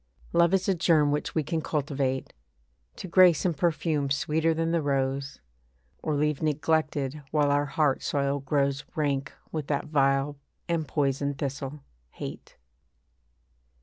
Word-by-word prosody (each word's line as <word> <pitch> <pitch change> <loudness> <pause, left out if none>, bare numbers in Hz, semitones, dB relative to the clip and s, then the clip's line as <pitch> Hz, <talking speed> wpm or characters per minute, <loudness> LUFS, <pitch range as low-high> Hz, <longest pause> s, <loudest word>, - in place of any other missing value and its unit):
Love 170 0 +4
is 190 -1 +1
a 195 - +4
germ 160 -4 +3
which 150 - -2
we 160 - +2
can 160 +2 -2
cultivate 140 -3 -2 0.6
To - - -7
grace 180 -3 +5
and 175 -3 +1
perfume 155 -3 0
sweeter 155 +4 +1
than 165 0 0
the 170 -1 +1
rose, 135 -1 -1 0.6
Or 155 - -1
leave 150 0 0
neglected 150 -2 0
while 145 -1 +2
our 145 0 +2
heart 150 -2 +1
soil 140 0 0
grows 140 0 0
Rank 140 -3 -1 0.2
with 155 -3 -4
that 145 - -1
vile 140 -1 +1 0.3
and 165 -3 -1
poison 140 0 0
thistle, 140 +1 -5 0.3
hate. - - -9
145 Hz, 140 wpm, -27 LUFS, 140-160 Hz, 0.6 s, grace